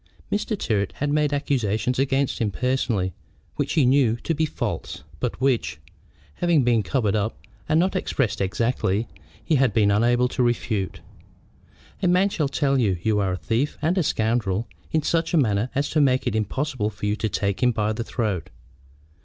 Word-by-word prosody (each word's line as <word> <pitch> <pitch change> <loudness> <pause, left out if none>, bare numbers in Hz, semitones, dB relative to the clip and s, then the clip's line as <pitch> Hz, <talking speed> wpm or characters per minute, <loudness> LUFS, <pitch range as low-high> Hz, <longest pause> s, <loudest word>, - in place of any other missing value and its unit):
Mr. 210 +1 -1
Tyrrwhit 100 - -1
had 145 +1 -2
made 150 -1 +2
accusations 125 -4 0
against 135 0 +1
himself 105 -4 -2
personally 125 -8 0 0.4
which - - -1
he 155 -5 +4
knew 125 -3 +4
to 140 +7 -2
be 160 +1 0
false, 105 - -4 0.2
but 120 - -3
which, 130 - +1 0.6
having 170 -5 +3
been 120 -2 +3
covered 110 0 0
up, 105 +1 -1 0.3
and 155 +1 +4
not 185 +3 +1
expressed 120 - -1
exactly, 110 +1 0 0.4
he 155 - +3
had 130 -5 +2
been 105 -3 +4
unable 120 +4 +3
to 125 - -2
refute. 115 -5 -1 1.0
A - - +2
man 180 +3 +4
shall 155 -7 -1
tell 140 -1 +1
you 100 -7 +2
you 110 -2 +2
are 95 -2 0
a - - -2
thief 115 +9 -1
and 160 +4 +1
a 190 - +2
scoundrel 110 - 0 0.2
in 155 -1 +1
such 165 +2 +1
a - - +4
manner 110 -4 +2
as 140 +1 +1
to 155 - +3
make 130 -2 +2
it - - -1
impossible 110 +1 -1
for 105 0 -7
you 105 0 +1
to 110 - -1
take 100 +1 -1
him 125 -1 +4
by 110 -1 0
the 115 +2 -3
throat. 105 -8 -2
120 Hz, 185 wpm, -24 LUFS, 105-145 Hz, 1.0 s, he